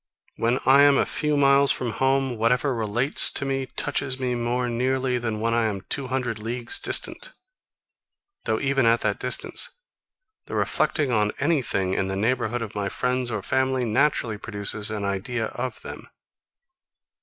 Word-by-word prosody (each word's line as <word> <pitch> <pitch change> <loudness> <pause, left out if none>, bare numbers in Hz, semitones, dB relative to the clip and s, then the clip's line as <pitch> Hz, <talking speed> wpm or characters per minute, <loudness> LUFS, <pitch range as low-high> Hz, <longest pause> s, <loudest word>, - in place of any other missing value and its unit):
When 120 +2 +1
I 135 +2 +6
am 145 -1 +5
a - - +2
few 150 -1 -1
miles 140 0 +5
from 125 -3 -2
home, 135 +1 0
whatever 125 +5 +1
relates 115 +4 +5
to 140 - 0
it 135 -1 -4
touches 135 -2 -2
me 125 -1 -1
more 120 +1 -1
nearly 125 +1 -1
than 115 -3 -3
when 115 +1 0
I 115 -1 +1
am 100 -3 -4
two 140 -2 -2
hundred 125 -3 -3
leagues 120 +2 0
distant; - - -2 1.1
though 110 -1 0
even 135 -3 +1
at 115 +1 +3
that - - -1
distance - - -1 0.7
the - - -7
reflecting 145 -5 0
on 105 -2 +1
any 155 -1 +1
thing 95 -5 -2
in 95 - -1
the 95 - -3
neighbourhood 115 +2 -1
of 110 - -8
my 100 -1 -3
friends 125 0 -2
or 105 -4 -4
family 130 +1 0
naturally 115 -2 0
produces 105 0 -1
an 105 -2 -4
idea 110 +4 -3
of 130 +1 -5
them. - - -8
125 Hz, 165 wpm, -24 LUFS, 110-130 Hz, 1.1 s, I